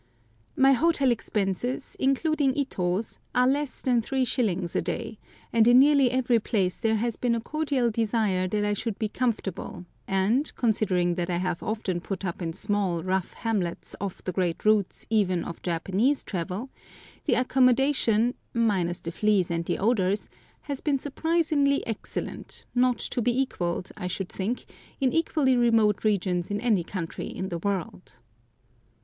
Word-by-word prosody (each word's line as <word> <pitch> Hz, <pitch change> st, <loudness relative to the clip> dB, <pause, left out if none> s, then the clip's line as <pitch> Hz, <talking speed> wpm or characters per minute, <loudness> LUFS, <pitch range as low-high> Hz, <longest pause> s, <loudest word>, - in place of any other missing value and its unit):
My 270 Hz, +1 st, +5 dB
hotel 280 Hz, -1 st, +3 dB
expenses 225 Hz, +3 st, -2 dB
(including 275 Hz, 0 st, +1 dB
Ito's) 195 Hz, -7 st, -1 dB, 0.2 s
are 250 Hz, -, +4 dB
less 285 Hz, +1 st, -1 dB
than 245 Hz, -3 st, +3 dB
3s. 225 Hz, -8 st, 0 dB
a -, -, +2 dB
day, 220 Hz, +6 st, -4 dB, 0.3 s
and 230 Hz, -1 st, +5 dB
in 240 Hz, +1 st, +7 dB
nearly 280 Hz, -1 st, +6 dB
every 245 Hz, -2 st, +2 dB
place 195 Hz, -4 st, -1 dB
there 220 Hz, -1 st, +2 dB
has 230 Hz, +1 st, -1 dB
been 240 Hz, -2 st, +1 dB
a -, -, -1 dB
cordial 275 Hz, -2 st, 0 dB
desire 210 Hz, -4 st, +1 dB
that 210 Hz, +2 st, 0 dB
I 205 Hz, -, +1 dB
should 215 Hz, 0 st, -3 dB
be 220 Hz, -, -1 dB
comfortable, 205 Hz, -6 st, -3 dB, 0.2 s
and, 205 Hz, +10 st, +1 dB
considering 190 Hz, -6 st, +1 dB
that 175 Hz, 0 st, -2 dB
I 175 Hz, -, 0 dB
have 180 Hz, -1 st, -2 dB
often 210 Hz, -5 st, -2 dB
put 195 Hz, +1 st, -5 dB
up 175 Hz, 0 st, -4 dB
in 165 Hz, -1 st, -2 dB
small, 195 Hz, -4 st, -1 dB
rough 185 Hz, 0 st, -1 dB
hamlets 200 Hz, -7 st, -2 dB
off 200 Hz, -2 st, -5 dB
the 185 Hz, -, -2 dB
great 175 Hz, -1 st, -1 dB
routes 210 Hz, -3 st, +2 dB
even 190 Hz, -5 st, +2 dB
of 170 Hz, -, -7 dB
Japanese 190 Hz, -, 0 dB
travel, 185 Hz, +7 st, -4 dB, 0.5 s
the -, -, +3 dB
accommodation, 250 Hz, -2 st, +3 dB, 0.2 s
minus 190 Hz, -7 st, +1 dB
the 165 Hz, -, -5 dB
fleas 200 Hz, -2 st, +1 dB
and 170 Hz, 0 st, -1 dB
the -, -, -1 dB
odours, 200 Hz, -2 st, +1 dB, 0.3 s
has 280 Hz, -3 st, -5 dB
been 290 Hz, -2 st, +1 dB
surprisingly 290 Hz, 0 st, +1 dB
excellent, 225 Hz, -3 st, -5 dB
not 250 Hz, 0 st, +3 dB
to 245 Hz, -, -2 dB
be 240 Hz, +2 st, +1 dB
equalled, 180 Hz, -9 st, -2 dB
I 180 Hz, -, -4 dB
should 185 Hz, +1 st, -3 dB
think, 215 Hz, +6 st, -3 dB, 0.3 s
in 260 Hz, -2 st, +1 dB
equally 300 Hz, -5 st, +2 dB
remote 225 Hz, -4 st, +3 dB
regions 185 Hz, -4 st, 0 dB
in 205 Hz, 0 st, -1 dB
any 215 Hz, -6 st, +2 dB
country 165 Hz, -2 st, -5 dB
in 190 Hz, -, -5 dB
the 170 Hz, -, -3 dB
world. 190 Hz, -1 st, -4 dB
215 Hz, 155 wpm, -26 LUFS, 185-255 Hz, 0.5 s, in